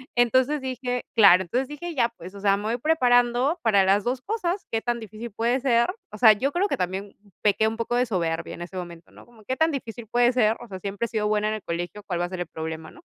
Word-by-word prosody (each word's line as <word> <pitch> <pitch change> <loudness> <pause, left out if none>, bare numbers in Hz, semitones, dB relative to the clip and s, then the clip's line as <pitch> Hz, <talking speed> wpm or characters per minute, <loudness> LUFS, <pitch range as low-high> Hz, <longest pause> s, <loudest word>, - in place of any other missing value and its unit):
Entonces 260 +4 +3
dije 250 -1 -3
claro, 190 -5 +7
entonces 255 +9 -2
dije: 325 +4 -6
"Ya, 235 -4 +2
pues, 180 +3 -10
o 200 - -10
sea, 200 0 +3
me 205 - -6
voy 230 +2 0
preparando 250 +1 +2
para 200 -4 +4
las 195 +1 +3
2 250 +1 -1
cosas, 390 - -2
¿qué 225 0 0
tan 240 -1 -1
difícil 220 +1 -8
puede 235 +5 0
ser?". 240 -3 +3 0.2
O 210 - -8
sea, 220 -2 +8
yo 270 +7 -1
creo 380 +4 +1
que - - -1
también 190 +2 -3 0.3
pequé 215 +1 +3
un 225 +1 -3
poco 235 +1 -2
de 250 +1 +3
soberbia 170 -5 -2
en - - -11
ese 180 +2 -9
momento, 170 -2 -8
¿no? - - -16
Como: 230 -3 -19
"¿Qué 260 +4 -3
tan 320 0 +3
difícil 235 -4 -6
puede 240 +2 +3
ser? 225 -3 +2
O 240 - -10
sea, 190 -2 -8
siempre 200 +4 -3
he - - -7
sido 215 -2 -1
buena 210 0 +1
en 215 - -1
el 215 - -7
colegio, 175 +5 -4
¿cuál 175 -3 -3
va - - +1
a 175 - -6
ser 185 - -6
el 175 - -3
problema?", 160 0 -6
¿no? 345 - -16
225 Hz, 265 wpm, -25 LUFS, 195-250 Hz, 0.3 s, sea